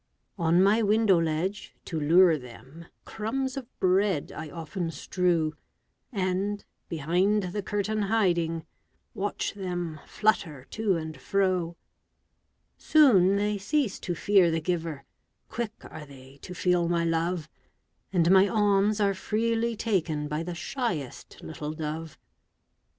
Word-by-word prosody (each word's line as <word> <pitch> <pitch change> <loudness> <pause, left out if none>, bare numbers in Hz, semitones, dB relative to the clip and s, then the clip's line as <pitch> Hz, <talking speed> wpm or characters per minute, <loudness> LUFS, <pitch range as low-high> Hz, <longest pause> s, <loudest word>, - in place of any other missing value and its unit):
On 170 +2 +4
my 210 +4 +4
window 210 -4 +4
ledge, 165 +6 -2
to 165 - -3
lure 165 +3 +5
them, 135 +5 -11 0.2
Crumbs 255 +5 -3
of 265 -3 -6
bread 185 -3 +2
I 155 0 -7
often 165 +2 -4
strew, 165 0 0 0.6
And, 195 0 -1 0.2
behind 180 +7 +1
the 205 - -2
curtain 205 +2 -2
hiding, 175 -6 +1 0.5
Watch 205 +1 -2
them 175 -5 -4
flutter 165 -11 0
to 215 -4 0
and 160 -1 -6
fro. 185 -4 0 1.0
Soon 205 - +5
they 205 0 0
cease 265 +2 0
to 175 - -3
fear 190 0 +4
the 165 0 0
giver, 165 -4 -3 0.5
Quick 230 -2 -3
are 155 -1 -9
they 135 0 -15
to 180 - -8
feel 175 -1 +1
my 170 -1 +1
love, 165 0 -1 0.6
And 175 -2 +3
my 190 +1 +6
alms 205 0 +2
are 200 -1 +2
freely 230 +4 -1
taken 170 -9 -1
By 150 +1 -2
the 170 +1 -5
shyest 175 - -4
little 155 -1 -5
dove. 155 0 -5
180 Hz, 130 wpm, -27 LUFS, 160-205 Hz, 1.0 s, my